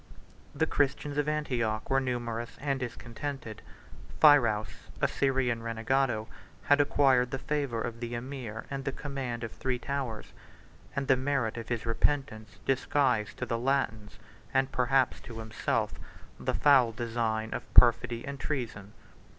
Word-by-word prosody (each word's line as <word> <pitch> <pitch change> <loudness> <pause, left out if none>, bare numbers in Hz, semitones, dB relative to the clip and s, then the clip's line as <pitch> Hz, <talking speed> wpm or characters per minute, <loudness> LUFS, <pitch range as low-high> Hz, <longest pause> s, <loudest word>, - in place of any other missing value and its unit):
The 160 - +2
Christians 145 0 0
of 150 +1 +1
Antioch 120 -8 -1
were 135 0 +3
numerous 120 -3 -3
and 140 -1 -1
discontented: 120 -1 -6 0.6
Phirouz, 115 -9 +4
a - - +3
Syrian 130 -4 0
renegado, 115 0 0 0.4
had 145 0 +5
acquired 135 -3 +3
the 135 - -2
favor 135 -3 -2
of 115 0 -4
the 120 0 -4
emir 120 -3 -6
and 135 -1 -3
the 135 - -1
command 135 -4 -4
of 115 - -4
three 130 -1 -2
towers; 125 -4 -4 0.6
and 140 -1 -1
the 135 - +6
merit 130 -3 0
of 115 -1 -7
his 120 -2 -2
repentance 115 -4 -1
disguised 130 -4 +1
to - - -2
the 115 - -2
Latins, 115 -5 -1 0.4
and 135 0 +2
perhaps 125 +1 +2
to 115 - -10
himself, 110 0 -1 0.5
the - - -1
foul 135 -5 +5
design 115 -1 -2
of - - -6
perfidy 120 -1 +5
and 140 -1 -6
treason. 115 -9 -4
125 Hz, 140 wpm, -30 LUFS, 115-135 Hz, 0.6 s, the